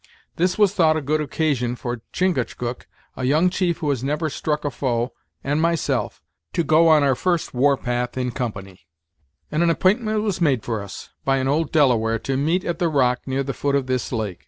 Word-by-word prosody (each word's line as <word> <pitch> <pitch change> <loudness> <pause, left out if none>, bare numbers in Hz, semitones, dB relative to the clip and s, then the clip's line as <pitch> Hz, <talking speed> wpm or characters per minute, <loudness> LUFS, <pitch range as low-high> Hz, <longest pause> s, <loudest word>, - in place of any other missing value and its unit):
This 180 +4 +1
was 205 -2 +4
thought 160 -5 +3
a - - -2
good 155 +3 0
occasion 140 -5 -1
for 120 -1 -5
Chingachgook, 125 -8 -2 0.3
a 130 - -5
young 155 +8 +3
chief 175 -3 0
who 150 - -2
has 130 -3 -2
never 150 +3 -1
struck 150 +1 -2
a 145 - 0
foe, 120 -2 -1 0.3
and 145 +3 0
myself; 155 -8 -1 0.3
to 170 - +1
go 160 +1 +4
on 155 -2 +5
our 135 -1 +3
first 175 +5 -1
war 135 +2 +3
path 125 0 -3
in 125 -1 -1
company, 95 - -6 0.6
and 155 - 0
an 170 - +3
app'intment 215 +5 +2
was 200 -5 -2
made 135 -8 +2
for 110 -3 -2
us, 100 -1 -9
by 135 0 +2
an 130 0 -1
old 150 +3 0
Delaware, 115 -7 +3
to 135 +4 -3
meet 160 +7 0
at 170 -1 -2
the 175 - +2
rock 125 -4 +2
near 135 +1 0
the 135 0 -3
foot 140 +1 -1
of 140 -2 +1
this 130 -2 -2
lake. 110 -7 -3
140 Hz, 205 wpm, -22 LUFS, 125-165 Hz, 0.6 s, on